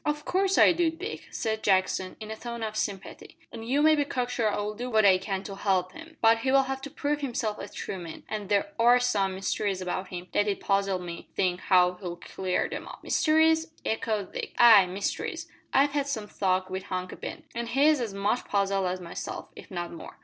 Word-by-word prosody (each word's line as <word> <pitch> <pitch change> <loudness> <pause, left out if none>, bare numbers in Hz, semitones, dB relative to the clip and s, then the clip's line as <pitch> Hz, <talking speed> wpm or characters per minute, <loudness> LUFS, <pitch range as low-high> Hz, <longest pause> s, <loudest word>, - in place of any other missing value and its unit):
"Of 295 0 -2
course 385 +1 +1
I - - +7
do, 340 -1 +2
Dick," 370 +7 -7
said 220 -1 -2
Jackson, 190 -2 +1
in 215 -1 -7
a - - -4
tone 235 0 -6
of 215 -1 -4
sympathy; 195 -2 -5
"an' 230 - -8
you 265 +6 +1
may 310 0 +6
be 290 - +2
cock 250 -3 -2
sure 225 -4 +1
I'll 210 +1 -2
do 245 +4 -5
what 220 -3 +3
I 190 -2 +6
can 195 0 -3
to 200 - -7
help 185 -2 0
'im. 325 0 -12
But 225 0 +5
he'll 270 +2 +3
have 265 0 -4
to 280 - -6
prove 290 +1 -2
himself 230 -5 -2
a - - -6
true 190 - -6
man, 165 -2 -9
an' 210 -2 -4
there 205 +9 +1
are 240 +2 +6
some 200 -6 +1
mysteries 195 0 -1
about 185 +1 -3
him 180 -1 -7
that 205 - +2
it 200 - -1
puzzles 195 -2 0
me 170 -1 -6
to - - -29
think 180 -2 +1
how 180 -1 +3
he'll 175 -2 -4
clear 185 +1 -2
'em - - -5
up." - - -11
"Mysteries?" 320 +1 +3 0.2
echoed 215 -3 -2
Dick. - - -5
"Ay, 220 -6 +8
mysteries. 190 +3 -3 0.2
I've 280 +2 +4
had 285 -1 -1
some 220 -7 -3
talk 185 -2 0
wi' 190 - -2
Hunky 185 -1 -5
Ben, - - -7
an' 235 0 -3
he's 285 +3 +3
as 230 -3 -2
much 200 +4 -1
puzzled 195 -1 +1
as 180 +1 -2
myself, 175 -1 -6
if - - -12
not 175 -2 -4
more." 165 - -10
210 Hz, 220 wpm, -27 LUFS, 190-260 Hz, 0.2 s, Ay